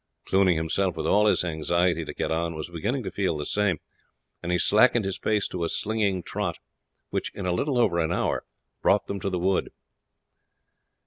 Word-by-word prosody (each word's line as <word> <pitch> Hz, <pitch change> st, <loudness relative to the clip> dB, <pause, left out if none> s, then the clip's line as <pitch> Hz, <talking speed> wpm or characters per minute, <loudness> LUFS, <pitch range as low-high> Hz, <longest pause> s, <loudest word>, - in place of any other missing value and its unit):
Cluny 95 Hz, -2 st, +3 dB
himself, 80 Hz, +3 st, 0 dB
with -, -, -3 dB
all 105 Hz, +1 st, +4 dB
his 105 Hz, -, +3 dB
anxiety 85 Hz, +1 st, +1 dB
to -, -, -6 dB
get -, -, -2 dB
on, 85 Hz, 0 st, -1 dB
was 80 Hz, +2 st, -6 dB
beginning 120 Hz, -, -2 dB
to 95 Hz, -, -4 dB
feel 95 Hz, -3 st, -1 dB
the 75 Hz, -, -4 dB
same, 100 Hz, -6 st, +1 dB, 0.6 s
and 90 Hz, -, -3 dB
he 90 Hz, -, +3 dB
slackened 110 Hz, +4 st, +4 dB
his 95 Hz, -, -2 dB
pace 105 Hz, -2 st, +1 dB
to 90 Hz, -, -3 dB
a 85 Hz, -, 0 dB
slinging 100 Hz, -4 st, 0 dB
trot, -, -, -3 dB, 0.5 s
which -, -, -2 dB
in 100 Hz, -, -5 dB
little 125 Hz, +10 st, 0 dB
over 95 Hz, -8 st, +3 dB
an 80 Hz, 0 st, 0 dB
hour -, -, 0 dB, 0.4 s
brought -, -, +3 dB
them 100 Hz, -, -4 dB
to 100 Hz, -, -2 dB
the 90 Hz, -, -1 dB
wood. 95 Hz, +2 st, +1 dB
90 Hz, 190 wpm, -26 LUFS, 85-105 Hz, 0.6 s, all